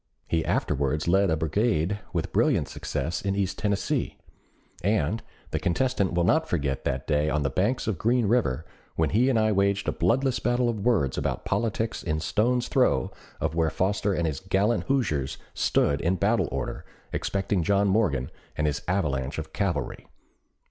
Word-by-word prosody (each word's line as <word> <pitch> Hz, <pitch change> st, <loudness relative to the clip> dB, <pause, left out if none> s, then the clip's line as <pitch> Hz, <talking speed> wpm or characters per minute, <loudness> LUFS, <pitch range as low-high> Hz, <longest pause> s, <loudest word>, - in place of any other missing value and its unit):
He 80 Hz, -1 st, +1 dB
afterwards 70 Hz, +3 st, 0 dB
led 95 Hz, +2 st, +4 dB
a 80 Hz, -, +2 dB
brigade 95 Hz, -, 0 dB
with 85 Hz, -3 st, -3 dB
brilliant -, -, +2 dB
success 80 Hz, +6 st, -3 dB
in 100 Hz, 0 st, -1 dB
East 100 Hz, -2 st, -1 dB
Tennessee. 100 Hz, -2 st, -1 dB, 0.7 s
And 105 Hz, +1 st, +1 dB, 0.3 s
the -, -, 0 dB
contestant 100 Hz, +1 st, 0 dB
will 85 Hz, 0 st, +2 dB
not 160 Hz, -, +2 dB
forget 70 Hz, -5 st, -1 dB
that 65 Hz, +1 st, -1 dB
day 75 Hz, 0 st, +1 dB
on 75 Hz, -1 st, 0 dB
the 70 Hz, -, 0 dB
banks 105 Hz, -, 0 dB
of 105 Hz, -6 st, -2 dB
Green 120 Hz, +1 st, +2 dB
River, 100 Hz, -, +1 dB, 0.3 s
when 80 Hz, -3 st, +1 dB
he 120 Hz, +6 st, +3 dB
and 130 Hz, -, +2 dB
I 110 Hz, 0 st, +3 dB
waged 100 Hz, 0 st, +1 dB
a -, -, +2 dB
bloodless 125 Hz, +8 st, +1 dB
battle 120 Hz, 0 st, +1 dB
of 115 Hz, -3 st, -2 dB
words 100 Hz, -, +1 dB
about -, -, -2 dB
politics 115 Hz, -1 st, -1 dB
in 80 Hz, -2 st, -1 dB
stone's 120 Hz, +9 st, +1 dB
throw -, -, +2 dB, 0.3 s
of -, -, -1 dB
where 80 Hz, -1 st, +2 dB
Foster 100 Hz, +3 st, 0 dB
and 85 Hz, -, 0 dB
his 75 Hz, -4 st, -2 dB
gallant 100 Hz, +5 st, +1 dB
Hoosiers 75 Hz, -, 0 dB, 0.2 s
stood 70 Hz, 0 st, +1 dB
in 90 Hz, +3 st, +1 dB
battle -, -, +1 dB
order, 65 Hz, -1 st, -4 dB, 0.3 s
expecting 95 Hz, -1 st, 0 dB
John 100 Hz, +3 st, +2 dB
Morgan 95 Hz, -, +1 dB, 0.3 s
and 75 Hz, -, +1 dB
his 75 Hz, -1 st, 0 dB
avalanche 70 Hz, -8 st, -1 dB
of -, -, -6 dB
cavalry." -, -, -2 dB
95 Hz, 170 wpm, -26 LUFS, 75-110 Hz, 0.7 s, led